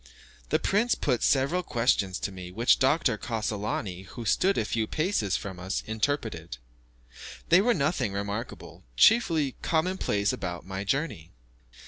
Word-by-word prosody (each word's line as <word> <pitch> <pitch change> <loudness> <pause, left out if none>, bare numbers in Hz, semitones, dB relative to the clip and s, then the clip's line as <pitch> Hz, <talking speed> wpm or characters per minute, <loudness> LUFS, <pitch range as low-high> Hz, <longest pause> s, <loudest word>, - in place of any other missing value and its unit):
The - - +3
prince 220 +5 +1
put 125 -5 0
several 140 +7 +2
questions 115 - +1
to - - -2
me, 90 -2 -8
which 115 +7 +3
Dr. 130 -4 +2
Cassolani, 105 -4 -3
who 120 +3 -8
stood 195 - +2
a 110 - +1
few 110 0 -1
paces 155 - 0
from 95 -3 -7
us, 95 +2 -3
interpreted. 110 - -2 0.9
They 175 +3 +7
were 240 +2 +3
nothing 140 - 0
remarkable, 100 +4 -5
chiefly 160 - +4
common 180 +4 0
places 100 0 0
about 90 -2 -5
my 95 +1 -4
journey. 100 - -2
115 Hz, 140 wpm, -27 LUFS, 100-155 Hz, 0.9 s, They